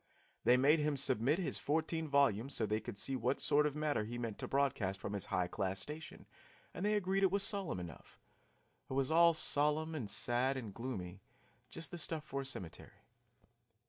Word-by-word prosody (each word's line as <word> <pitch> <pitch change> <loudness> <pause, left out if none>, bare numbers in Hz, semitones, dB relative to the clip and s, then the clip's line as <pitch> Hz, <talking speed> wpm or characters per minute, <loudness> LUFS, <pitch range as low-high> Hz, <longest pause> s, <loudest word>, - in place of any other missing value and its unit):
They 125 - +6
made 145 +5 +5
him 150 -1 0
submit 130 +2 +2
his 185 - -2
fourteen 160 +2 -1
volumes 140 -3 +2
so 110 - +1
they 105 +1 0
could 115 -2 -7
see 135 +5 0
what 125 +2 0
sort 150 +1 +4
of 145 - -4
matter 150 -7 0
he 120 +3 -5
meant 115 -3 -4
to - - -4
broadcast 120 -9 0
from 100 - -5
his 100 -3 -1
high 90 - 0
class 95 +1 -2
station, 150 +9 -5 0.5
and - - -5
they 210 +1 +2
agreed 195 -1 +1
it 195 - +5
was 200 +2 +2
solemn 195 - +1
enough; 85 -3 -10 0.7
it - - -4
was 135 +2 0
all 170 0 +6
solemn 150 +2 +1
and 125 -10 -4
sad 125 +6 0
and 110 -6 -6
gloomy, 100 -7 -6 0.5
just 165 - -5
the 175 - -4
stuff 160 -1 -1
for 140 -2 -4
a - - -7
cemetery. 95 -10 -7
135 Hz, 195 wpm, -36 LUFS, 110-155 Hz, 0.7 s, They